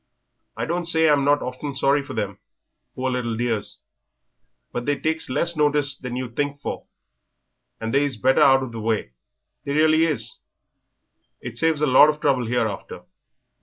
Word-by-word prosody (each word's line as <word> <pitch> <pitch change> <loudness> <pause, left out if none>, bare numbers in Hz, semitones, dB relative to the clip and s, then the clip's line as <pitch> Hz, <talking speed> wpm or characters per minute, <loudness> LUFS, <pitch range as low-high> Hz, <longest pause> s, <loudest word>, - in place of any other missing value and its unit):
I - - -2
don't 175 +1 -2
say 160 -1 +3
I'm 145 -2 +3
not 145 +1 +2
often 130 +2 -5
sorry 140 +1 +2
for 140 - -9
them, - - -3 0.6
poor 130 0 -2
little 120 -3 -2
dears, 115 -3 -2 0.9
but 120 +1 -5
they 145 -1 +1
takes 160 -2 -1
less 170 +6 +1
notice 145 -2 +1
than 125 -3 -7
you'd 125 -2 -5
think 145 0 -2
for, - - -6 0.9
and 115 0 -4
they 140 +1 +3
is 140 -5 -2
better 130 +4 +3
out 135 -1 +5
of 130 - -6
the 115 -1 -6
way; 110 - -1 0.5
they 140 - -3
really 155 +2 +4
is, 115 -8 -3 1.0
it 120 -1 -8
saves 160 -2 +2
a - - +5
lot 145 +2 +7
of 150 0 -2
trouble 130 -5 +1
hereafter. 115 -4 -3
140 Hz, 170 wpm, -23 LUFS, 120-150 Hz, 1.0 s, lot